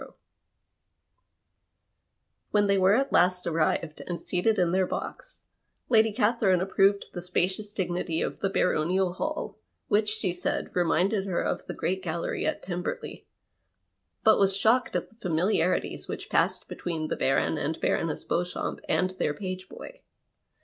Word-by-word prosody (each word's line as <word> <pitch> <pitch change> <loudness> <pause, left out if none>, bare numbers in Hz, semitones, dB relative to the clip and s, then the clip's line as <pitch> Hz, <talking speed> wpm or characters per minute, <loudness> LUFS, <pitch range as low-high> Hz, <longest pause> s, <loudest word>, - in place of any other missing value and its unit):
Wlien 205 -1 +3
they 200 -1 +3
were 190 +2 +5
at 275 +3 0
last 180 0 +3
arrived 165 -1 0
and 175 -1 -3
seated 215 +4 0
in 175 -2 +2
their 185 0 +2
box - - -6 0.4
Lady 220 -2 +5
Catherine 210 -4 +2
approved 195 +2 +2
the 175 - -5
spacious 185 +3 -1
dignity 175 -4 -2
of - - -3
the 195 - 0
baronial 180 0 +1
hall, 310 +11 -4 0.3
which, 210 +1 +3
she 210 -4 -1
said, 180 - -3
reminded 185 +3 +2
her 180 -3 0
of - - -2
the - - -5
great 190 +1 -1
gallery 170 -2 -2
at - - -2
Pemberley, 180 -1 -5 1.0
but 220 - +6
was 195 -1 +3
shocked 235 +5 +2
at - - -1
the 225 - -24
familiarities 180 0 0
which - - -6
passed - - +1
between 160 -3 -4
the - - -1
Baron 135 +3 +1
and 150 +2 -2
Baroness 160 -3 0
Beauxchamps 180 +1 -2
and 185 0 +2
their 145 - 0
page 185 -2 -5
boy. - - -11
185 Hz, 145 wpm, -27 LUFS, 175-205 Hz, 1.0 s, but